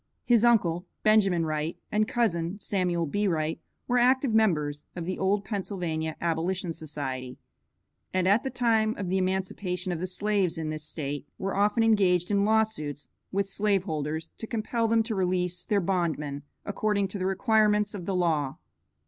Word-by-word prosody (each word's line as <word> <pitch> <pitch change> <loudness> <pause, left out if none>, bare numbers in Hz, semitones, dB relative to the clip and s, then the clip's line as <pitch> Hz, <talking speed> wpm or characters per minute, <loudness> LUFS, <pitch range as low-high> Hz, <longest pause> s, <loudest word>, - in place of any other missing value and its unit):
His 235 -2 +4
uncle, 185 -7 +3 0.2
Benjamin 195 -6 +4
Wright, 155 +1 -2
and 215 0 +2
cousin, 185 -7 0
Samuel 180 -4 0
B. 205 +7 0
Wright, 160 -3 -1 0.3
were 245 0 +3
active 255 0 +3
members 150 -10 +2
of 175 -2 -4
the 185 +1 -3
old 200 +1 +1
Pennsylvania 175 -6 -2
Abolition 170 +1 -1
Society, 135 -5 -5 0.7
and 185 -1 +1
at 205 +7 +4
the 265 - -2
time 225 -3 +2
of 195 -3 -3
the 190 +1 +1
emancipation 185 0 -2
of 175 - -2
the 185 - -2
slaves 190 -2 0
in 155 -1 -3
this 155 -1 -5
state 145 -2 -4
were 195 0 -3
often 210 +3 +3
engaged 190 -5 +3
in 200 0 +3
lawsuits 215 -10 0 0.2
with 200 0 0
slave 200 -1 +1
holders 155 -2 -3
to 225 - -5
compel 230 +1 -1
them 225 0 +3
to 225 0 -3
release 180 -2 0
their 205 - +3
bondmen, 165 -6 -1 0.2
according 205 -1 0
to 200 - -5
the 185 - 0
requirements 210 +1 +2
of 185 -4 -6
the 195 - 0
law. 155 -6 0
190 Hz, 165 wpm, -27 LUFS, 165-210 Hz, 0.7 s, His